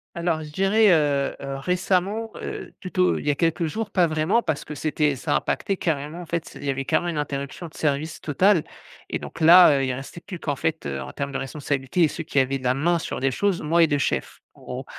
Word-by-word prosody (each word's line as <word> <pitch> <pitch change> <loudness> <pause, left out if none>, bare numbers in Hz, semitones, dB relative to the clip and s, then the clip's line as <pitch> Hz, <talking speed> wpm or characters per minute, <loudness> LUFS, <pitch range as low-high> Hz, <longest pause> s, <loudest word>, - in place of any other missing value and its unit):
Alors 170 -2 -1
je 150 - -9
dirais, 195 +6 +3
heu 145 -4 +2
heu, 135 0 -5
récemment, 185 +7 0
heu, - - -6
plutôt, 185 0 +1
il - - -7
y - - +4
a 145 - +2
quelques 165 +1 +1
jours 215 +5 -4
pas 180 -3 +3
vraiment 155 +9 +1
parce 160 -8 -2
que 150 - -7
c'était, 150 0 0
ça 145 +3 -2
a - - +4
impacté 195 - -2
carrément, 155 0 -2
en 175 - -7
fait, 170 0 -4
il - - -10
y 140 - +1
avait 135 +1 -3
carrément 155 +5 0
une 155 -3 -2
interruption 140 +4 -4
de 155 - -17
service 150 +1 -1
totale 175 +3 +3 0.5
et - - -1
donc - - -9
là, 165 -2 +8
heu, 135 - 0
il 130 - -1
restait 135 +6 -8
plus 185 -1 -8
qu'en 145 -3 -2
fait, 155 - -2
heu, 70 -1 -3
en 65 - -7
termes 140 0 -4
de 135 - -2
responsabilité 135 +3 -2
et 160 - +6
ceux 165 - -5
qui 140 - 0
avaient 135 +1 +1
la 125 -1 0
main 170 +6 +1
sur - - -4
les 135 - +2
choses 195 +7 0
moi 165 +2 +3
et - - +5
2 145 -1 0
chefs, - - -2 0.2
en - - -19
gros 130 +1 -6
155 Hz, 250 wpm, -24 LUFS, 140-175 Hz, 0.5 s, là